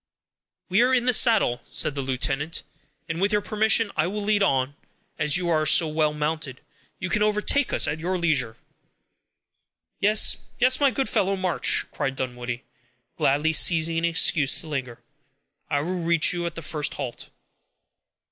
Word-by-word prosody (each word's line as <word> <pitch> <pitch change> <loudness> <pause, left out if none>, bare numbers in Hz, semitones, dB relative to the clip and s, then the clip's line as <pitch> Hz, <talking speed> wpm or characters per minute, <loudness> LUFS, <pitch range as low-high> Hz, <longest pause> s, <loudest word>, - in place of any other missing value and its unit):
"We 190 +5 +3
are 255 +1 +3
in 245 -1 0
the 250 - +3
saddle," 220 - +3
said 150 - 0
the 140 - -4
lieutenant, 135 +4 -3 0.4
"and, 165 +1 -4
with 200 +2 +1
your 210 0 +1
permission, 215 +1 +1
I 155 +1 0
will 205 +2 -4
lead 205 0 +1
on; 135 -6 0 0.4
as 150 0 +4
you 180 -1 -3
are 155 -2 +1
so 160 +2 +5
well 155 0 0
mounted, 150 -3 -4 0.4
you 190 - -5
can 210 +4 -1
overtake 210 +6 +1
us - - +3
at 155 - -3
your 180 +3 -2
leisure." 145 -10 -1 1.4
"Yes, 210 +2 +3 0.2
yes, 255 +1 +3
my 285 -1 +4
good 265 +1 -2
fellow; 195 -3 0
march," 185 -3 +1
cried 135 - -3
Dunwoodie, 125 -1 -5 0.5
gladly 150 +4 +1
seizing 165 0 +3
an 165 - -1
excuse 165 -3 +3
to 160 - -9
linger. 130 -5 -5 0.7
"I 145 -2 0
will 180 +3 -4
reach 170 0 +2
you 175 -1 -3
at 170 - -7
the 165 - -8
first 150 0 -2
halt." 130 -4 -7
165 Hz, 165 wpm, -24 LUFS, 145-205 Hz, 1.4 s, so